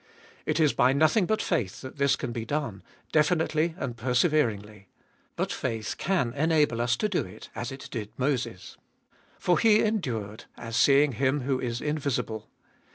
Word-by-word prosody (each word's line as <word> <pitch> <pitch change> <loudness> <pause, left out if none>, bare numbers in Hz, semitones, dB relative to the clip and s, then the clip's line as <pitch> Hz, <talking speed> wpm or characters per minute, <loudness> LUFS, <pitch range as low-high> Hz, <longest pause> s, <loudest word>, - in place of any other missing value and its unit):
It - - +1
is 155 -3 +4
by 130 +2 +4
nothing 155 +7 +3
but 215 - 0
faith 120 - -1
that 130 +2 -9
this 140 0 +3
can 130 -4 -4
be 115 -1 -4
done, 120 -6 -3 0.3
definitely 160 +1 +2
and 120 -10 -4
perse 125 +2 +1
veringly. 105 - 0 0.5
But - - -2
faith 110 -2 -3
can 170 -12 0
enable 150 -5 +2
us 120 +1 +1
to 215 - 0
do 200 -4 0
it, 90 - -12
as 120 - -4
it 135 0 -8
did 105 -3 -4
Moses. 125 -7 -2 0.6
For 175 - +2
he 215 -2 +5
endured, 115 - -2
as 115 -1 -6
seeing 140 +3 +5
Him 135 +3 0
who 130 0 0
is 120 -1 -3
invisible. 140 -7 -2
135 Hz, 165 wpm, -27 LUFS, 115-155 Hz, 0.6 s, he